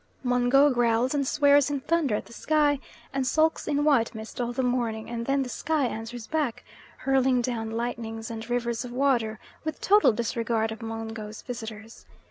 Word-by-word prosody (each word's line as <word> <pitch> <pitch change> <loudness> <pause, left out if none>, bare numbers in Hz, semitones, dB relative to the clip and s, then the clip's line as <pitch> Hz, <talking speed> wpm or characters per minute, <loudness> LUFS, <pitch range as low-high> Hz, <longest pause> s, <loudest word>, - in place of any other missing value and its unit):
Mungo 250 +3 +4
growls 240 +1 +2
and 280 -2 0
swears 285 -1 +4
in 285 -2 -2
thunder 300 -6 +1
at - - -3
the - - -14
sky, 295 0 +2 0.3
and 270 -1 0
sulks 315 +3 +2
in 290 0 +1
white 265 -7 +3
mist 220 +3 -6
all 240 0 -1
the 260 +2 -1
morning, 235 -3 -1
and 235 0 -4
then 275 0 +2
the - - -6
sky 295 +3 0
answers 225 0 -5
back, 300 -6 -2 0.3
hurling 265 -1 +2
down 235 -2 -2
lightnings 225 -1 -4
and 225 0 -7
rivers 235 -1 -1
of 245 - -7
water, 245 -4 +1 0.3
with 315 0 -4
total 415 -5 +5
disregard 230 0 -1
of 220 - -7
Mungo's 225 -1 -6
visitors. 225 -2 -8
245 Hz, 175 wpm, -27 LUFS, 225-275 Hz, 0.3 s, total